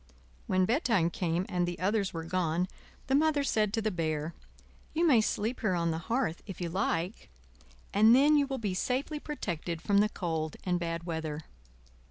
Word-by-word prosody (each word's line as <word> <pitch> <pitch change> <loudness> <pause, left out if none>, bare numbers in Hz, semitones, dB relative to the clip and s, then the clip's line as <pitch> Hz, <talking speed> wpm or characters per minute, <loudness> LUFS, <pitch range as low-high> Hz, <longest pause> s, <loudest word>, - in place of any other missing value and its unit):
When 185 0 +3
bedtime 225 - +2
came 175 +1 -1
and 175 -1 0
the 175 - -3
others 200 +1 0
were 165 -1 -5
gone, 175 0 0 0.4
the 265 - -1
Mother 295 0 +3
said 215 -6 +1
to 225 -1 0
the 215 - +1
Bear: 160 -2 -2 0.6
"You 335 +2 +3
may 260 -9 +6
sleep 220 +3 -1
here 190 -5 +1
on 170 -1 +1
the 160 - -2
hearth 230 -8 0
if 190 -4 -7
you 175 -2 -2
like, 180 +1 -2 0.6
and 220 +4 +7
then 290 +3 +6
you 285 -1 +3
will 270 -1 -3
be 210 -6 -2
safely 265 - -1
protected 175 - -4
from 200 +4 +2
the 210 +1 +4
cold 160 -6 -3
and 180 -1 0
bad 170 -1 -3
weather." 160 -3 -3
185 Hz, 185 wpm, -30 LUFS, 170-230 Hz, 0.6 s, and